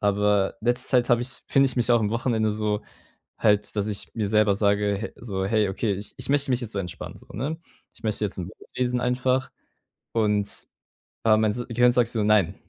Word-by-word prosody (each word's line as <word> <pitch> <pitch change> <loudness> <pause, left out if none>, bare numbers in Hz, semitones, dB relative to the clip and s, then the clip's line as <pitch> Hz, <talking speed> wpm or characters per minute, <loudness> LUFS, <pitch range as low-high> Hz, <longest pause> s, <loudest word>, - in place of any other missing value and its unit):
Aber 100 -1 +2
letzte 120 +2 0
Zeit 125 -2 +3
habe 120 0 +4
ich 130 +1 -7
finde 135 0 +4
ich 130 - -2
mich 120 0 +2
auch 120 - +4
am 105 -1 0
Wochenende 115 -2 +1
so 105 0 -1 0.6
halt, 105 -2 +2
dass 105 -1 0
ich 105 -2 -6
mir 105 -3 -1
selber 105 -2 +3
sage 100 -1 +2
h - - -3
so: 95 -5 -3
„Hey, 105 0 +2
okay, 100 +2 -1
ich 100 +1 -7
ich - - -7
möchte 145 -1 +2
mich 125 -1 +2
jetzt 115 -2 -6
so 100 - -3
entspannen 90 -3 -7
so.“ - - -17
Ne? 150 +8 -3 0.4
Ich - - -20
möchte 110 -1 -1
jetzt 100 - -3
'n 90 - -3
Buch 105 - -15
lesen 125 -1 0
einfach. 125 +1 0 0.6
Und, 105 -2 0 0.6
äh, 110 -1 +6
mein 110 -1 +2
s 120 +3 -4
Gehirn 120 +1 +4
sagt 120 -2 +2
so: 110 -3 0
„Nein! 105 -4 +3
110 Hz, 220 wpm, -25 LUFS, 105-120 Hz, 0.6 s, äh